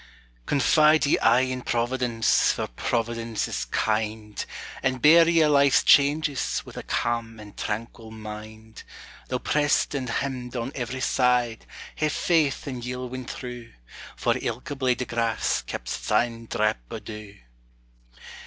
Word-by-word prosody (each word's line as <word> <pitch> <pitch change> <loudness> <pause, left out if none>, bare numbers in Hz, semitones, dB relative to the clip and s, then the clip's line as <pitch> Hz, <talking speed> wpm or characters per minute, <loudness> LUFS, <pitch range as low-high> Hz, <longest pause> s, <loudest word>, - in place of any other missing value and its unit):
Confide 155 +2 +4
ye 140 - +2
aye 125 - +4
in 130 0 -2
Providence, 120 -1 +1
for - - -2
Providence 115 - -2
is - - -3
kind, 110 -1 -2 0.4
And 130 0 0
bear 165 +4 +7
ye 165 -1 +4
a' - - +4
life's 140 -2 +4
changes, 145 0 +3
wi' - - -11
a - - -5
calm 115 -1 -2
and 105 -1 -12
tranquil 110 +1 -5
mind, 110 0 -10 0.5
Though - - -1
pressed 145 -1 +1
and 130 -3 -3
hemmed 125 0 -3
on 120 +2 -3
every 130 0 -4
side, 125 -3 +1 0.3
ha'e 155 - +2
faith 155 -2 +1
and 130 -4 -5
ye 125 +1 -4
'll 125 0 -5
win 130 0 -6
through, 120 -2 -8 0.4
For - - +1
ilka 125 +5 -4
blade 130 -2 0
o' - - -7
grass 115 -2 0
keps - - -5
its - - -6
ain 115 -1 +1
drap 105 - 0
o' - - -5
dew. 105 -2 -9
120 Hz, 150 wpm, -25 LUFS, 115-135 Hz, 0.5 s, bear